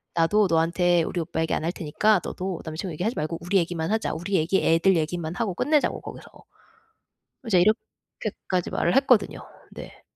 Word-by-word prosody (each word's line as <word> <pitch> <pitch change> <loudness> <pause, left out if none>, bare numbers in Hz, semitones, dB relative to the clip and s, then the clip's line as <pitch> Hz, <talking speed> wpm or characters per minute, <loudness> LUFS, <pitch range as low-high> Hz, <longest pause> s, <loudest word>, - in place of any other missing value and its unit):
"나도 185 +6 +3
너한테 170 +1 +2
우리 175 - -3
오빠 160 0 -3
얘기 160 - -1
안 - - -3
할 170 - 0
테니까 185 +5 +1
너도 185 -2 -4
남자 155 0 -6
친구 185 -4 -5
얘기하지 195 +10 -2
말고 155 +2 -3
우리 180 +4 +1
얘기만 170 -1 -1
하자. 220 0 0
우리 190 +4 -3
얘기 170 +3 +1
애들 170 +4 +4
얘기만 160 +1 -2
하고 220 -5 -1
끝내자고 295 - +1
거기서." - - -10 1.2
이제 185 -5 +4
이렇게까지 215 -3 -2
말을 175 - 0
했거든요. 260 -5 +3 0.3
네. - - -11
175 Hz, 395 characters per minute, -25 LUFS, 165-205 Hz, 1.2 s, 애들